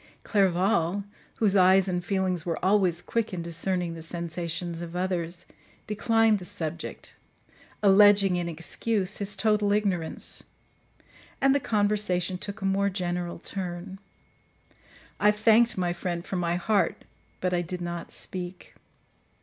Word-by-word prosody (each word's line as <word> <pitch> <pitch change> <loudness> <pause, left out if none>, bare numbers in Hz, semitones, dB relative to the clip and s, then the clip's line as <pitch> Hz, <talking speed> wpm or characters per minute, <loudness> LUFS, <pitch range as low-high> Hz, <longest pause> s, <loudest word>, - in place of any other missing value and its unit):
Clerval, 190 -1 +2 0.3
whose 205 -3 +2
eyes 190 0 +5
and 180 -1 -1
feelings 185 -2 0
were 165 -1 -2
always 185 -3 +2
quick 225 -4 -2
in 170 - -4
discerning 175 +1 -2
the 165 - -8
sensations 170 0 -4
of 170 0 -7
others, 180 -2 -2 0.4
declined 225 0 +2
the 180 - -8
subject, 165 -1 -5 0.7
alleging, 200 -1 +6
in 175 -1 -2
excuse, 185 +5 -1
his 200 0 -1
total 210 0 +2
ignorance; 195 -6 -1 1.0
and 270 0 +4
the 285 - +3
conversation 205 -6 0
took 200 +1 -5
a - - -1
more 195 +1 +2
general 175 -2 -3
turn. 185 +1 -5 1.2
I 210 - +5
thanked 220 +2 +4
my 175 -1 0
friend 175 -1 -4
from 190 - -3
my 170 0 0
heart, 200 +3 0 0.3
but 180 0 -1
I 175 - +2
did 180 +1 -5
not 175 -1 -5
speak. 180 0 -5
185 Hz, 135 wpm, -27 LUFS, 175-205 Hz, 1.2 s, alleging